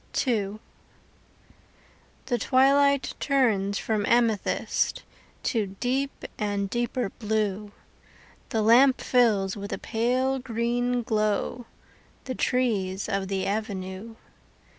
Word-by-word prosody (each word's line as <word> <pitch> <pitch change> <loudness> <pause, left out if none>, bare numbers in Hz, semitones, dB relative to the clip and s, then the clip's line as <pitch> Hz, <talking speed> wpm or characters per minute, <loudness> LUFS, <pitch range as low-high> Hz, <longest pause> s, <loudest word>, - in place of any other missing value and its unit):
II 210 -5 0 1.7
The 245 -2 -1
twilight 280 +1 +3
turns 215 -8 +1
from 215 -2 -1
amethyst 230 -4 +1 0.4
To 225 -6 0
deep 270 +2 -1 0.2
and 200 -2 -1
deeper 240 -1 -1
blue, 210 -2 -1 0.8
The 220 -4 0
lamp 255 +4 +6
fills 210 -7 +2
with 200 -1 -7
a - - -2
pale 255 +4 0
green 245 0 -1
glow 215 +2 -1 0.6
The 260 - -4
trees 205 -8 0
of 195 -2 -1
the 190 -1 -2
avenue. 200 0 -4
225 Hz, 95 wpm, -26 LUFS, 205-250 Hz, 1.7 s, lamp